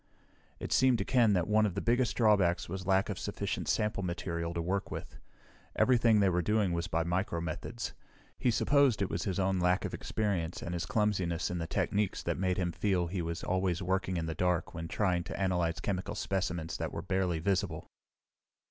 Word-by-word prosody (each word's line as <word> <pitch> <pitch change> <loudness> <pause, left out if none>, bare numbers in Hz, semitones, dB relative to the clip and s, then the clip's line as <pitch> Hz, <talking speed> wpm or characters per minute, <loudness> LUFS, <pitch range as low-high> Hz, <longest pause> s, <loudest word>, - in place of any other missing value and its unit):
It - - -6
seemed 130 -2 +4
to 100 - -2
Ken 120 -5 +4
that 90 -3 +1
one 105 0 +4
of 95 - -5
the - - 0
biggest 120 +2 +1
drawbacks 100 -7 +3
was 95 +1 -5
lack 95 +1 +3
of 100 - -4
sufficient - - -3
sample 105 -1 0
material 85 -2 -3
to - - -1
work 95 +4 -1
with. - - -7 0.6
Everything 120 -4 +4
they 100 -2 +4
were 90 0 +1
doing 105 -1 +1
was 85 +1 -1
by 80 -2 0
micromethods. 85 +5 -3 0.5
He 125 - +2
supposed 130 -2 +3
it 95 - -3
was - - -2
his 95 -4 -1
own 95 -1 +1
lack 90 +1 +2
of - - -4
experience 95 -6 -2
and 85 - -4
his 90 0 -3
clumsiness 95 -6 0
in 90 - -2
the 80 - -3
techniques 100 +4 0
that - - -2
made 95 -1 +1
him 90 -2 0
feel 95 -1 0
he 90 0 -2
was 85 +1 -4
always 95 -1 0
working 95 0 0
in 80 - -1
the 80 - -3
dark 90 0 0
when 80 -1 -5
trying 90 -1 0
to - - -6
analyze 90 -4 0
chemical 95 -2 -3
specimens 90 -4 -2
that - - -3
were - - -5
barely 95 -3 0
visible. 95 +3 -1
95 Hz, 200 wpm, -31 LUFS, 85-105 Hz, 0.6 s, seemed